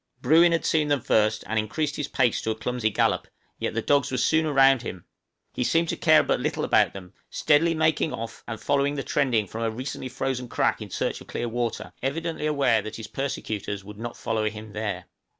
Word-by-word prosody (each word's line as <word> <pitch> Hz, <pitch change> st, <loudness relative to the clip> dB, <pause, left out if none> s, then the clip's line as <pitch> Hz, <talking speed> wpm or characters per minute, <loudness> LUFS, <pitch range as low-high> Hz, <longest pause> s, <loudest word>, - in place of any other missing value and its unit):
Bruin 170 Hz, +2 st, +5 dB
had 165 Hz, -, 0 dB
seen 155 Hz, -2 st, +2 dB
them 145 Hz, -1 st, +2 dB
first, 110 Hz, 0 st, +2 dB
and 110 Hz, 0 st, 0 dB
increased 145 Hz, +7 st, -2 dB
his 150 Hz, -, -3 dB
pace 125 Hz, -5 st, +1 dB
to -, -, -3 dB
a 110 Hz, -, 0 dB
clumsy 115 Hz, 0 st, -1 dB
gallop, -, -, +1 dB, 0.3 s
yet -, -, -2 dB
the 115 Hz, -, -1 dB
dogs 140 Hz, -1 st, +2 dB
were 130 Hz, -, -2 dB
soon 160 Hz, +5 st, +2 dB
around 135 Hz, -3 st, +5 dB
him; 95 Hz, -7 st, -7 dB, 0.5 s
he 125 Hz, -, -1 dB
seemed 165 Hz, +6 st, +2 dB
to -, -, 0 dB
care 155 Hz, -1 st, +5 dB
but -, -, 0 dB
little -, -, -2 dB
about -, -, +3 dB
them, 90 Hz, -2 st, -10 dB, 0.2 s
steadily 165 Hz, +3 st, +3 dB
making 155 Hz, 0 st, +1 dB
off 115 Hz, 0 st, -6 dB
and 115 Hz, -2 st, -5 dB
following 140 Hz, 0 st, +1 dB
the 140 Hz, -, -3 dB
trending 125 Hz, -7 st, +1 dB
of -, -, -19 dB
a 115 Hz, 0 st, -1 dB
recently 130 Hz, +3 st, -5 dB
frozen 125 Hz, 0 st, -3 dB
crack -, -, 0 dB
in -, -, -7 dB
search -, -, -2 dB
of -, -, -13 dB
clear 120 Hz, -, -3 dB
water, 120 Hz, 0 st, -3 dB
evidently 160 Hz, +3 st, -2 dB
aware 135 Hz, -7 st, +2 dB
that 110 Hz, +1 st, -7 dB
his 110 Hz, -, -7 dB
persecutors 105 Hz, -6 st, -4 dB
would 105 Hz, +1 st, -11 dB
not 120 Hz, +1 st, -6 dB
follow 110 Hz, -2 st, -1 dB
him 110 Hz, 0 st, -10 dB
there. 105 Hz, -4 st, -3 dB
125 Hz, 215 wpm, -25 LUFS, 110-145 Hz, 0.5 s, Bruin